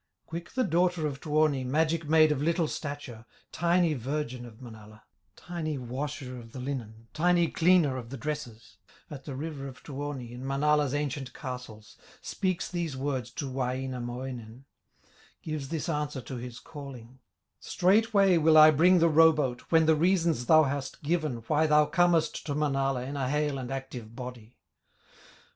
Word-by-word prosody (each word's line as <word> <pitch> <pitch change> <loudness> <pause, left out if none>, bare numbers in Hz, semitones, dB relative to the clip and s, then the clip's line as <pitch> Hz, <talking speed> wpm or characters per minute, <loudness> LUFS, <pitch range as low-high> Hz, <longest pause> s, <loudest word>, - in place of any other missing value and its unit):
Quick 170 +6 -7
the 260 -1 +1
daughter 175 -3 +1
of 140 -2 -4
Tuoni, 150 -3 +1
Magic 155 +4 0
maid 155 -1 +6
of 145 -2 -1
little 165 +1 +1
stature, 140 -7 -6 0.3
Tiny 170 -1 +2
virgin 130 -2 -4
of 110 -1 -15
Manala, 110 -3 -12 0.3
Tiny 160 -4 -4
washer 130 +1 -5
of 115 0 -13
the 130 - -7
linen, 115 -4 -6
Tiny 175 +1 +3
cleaner 165 -6 +3
of 120 -2 -7
the 135 - -6
dresses, 130 -5 -6 0.3
At 140 -2 -8
the 140 - -6
river 140 -1 -5
of 130 -1 -11
Tuoni, 140 -4 -6
In 125 +1 -8
Manala's 145 +1 +1
ancient 140 -3 -3
castles, 115 -5 -8 0.2
Speaks 185 -3 -2
these 170 -6 -3
words 130 -3 -2
to 145 - -4
Wainamoinen, 125 -1 -4 0.8
Gives 155 -4 -4
this 165 0 -3
answer 150 -4 -2
to 125 +3 -7
his 120 0 -7
calling: 130 -3 -11 0.4
"Straightway 200 -1 +3
will 160 0 +5
I 155 0 +9
bring 175 +5 +5
the 170 -1 +4
row 160 +1 +7
boat, 135 -6 -2
When 160 -1 +4
the 160 - +5
reasons 165 -5 +1
thou 155 -1 +7
hast 140 0 -4
given 150 -7 -1
Why 155 +4 +2
thou 150 0 +5
comest 175 -1 +2
to 145 - -2
Manala 135 -3 0
In 140 +3 -5
a 135 -2 -1
hale 150 -1 0
and 125 -2 -6
active 130 -4 -6
body." 125 -2 -9
145 Hz, 160 wpm, -28 LUFS, 125-160 Hz, 0.8 s, I